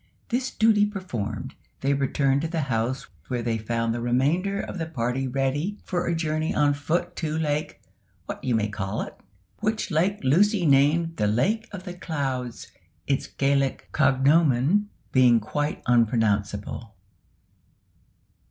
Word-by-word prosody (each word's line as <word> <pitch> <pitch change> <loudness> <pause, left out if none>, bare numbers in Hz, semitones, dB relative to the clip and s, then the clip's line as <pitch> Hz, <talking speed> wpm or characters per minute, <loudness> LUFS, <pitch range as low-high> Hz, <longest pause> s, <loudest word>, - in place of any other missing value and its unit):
This 255 +2 0
duty 215 -3 +3
performed, 120 - -5 0.3
they 140 +1 +2
returned 140 0 +1
to 165 - -1
the 165 -1 -2
house, 125 -1 -1 0.2
where 120 -2 -2
they 115 -1 -1
found 115 +1 -1
the 120 - -3
remainder 150 +12 +1
of 190 - -5
the 165 - -2
party 130 -2 -2
ready 135 +9 -1
for 175 -1 -2
a 170 - +1
journey 155 -1 -1
on 145 -1 +3
foot 170 +5 -2
to 155 -1 -2
Lake 150 -1 -1 0.5
"What - - -6
you 125 -3 +1
may 110 -1 +1
call 100 0 -3
it," - - -9 0.4
which 215 -1 -1
lake 185 +6 +1
Lucy 185 +7 +3
named 155 +4 +3
the 105 - +1
Lake 190 - +1
of 190 -3 -7
the 180 -2 -6
Clouds, 135 -8 -4 0.3
its 135 -1 0
Gaelic 140 -1 0
cognomen 140 +6 +3 0.2
being 125 -3 +5
quite 145 +8 -3
unpronounceable. 110 -3 +1
140 Hz, 145 wpm, -25 LUFS, 120-170 Hz, 0.5 s, being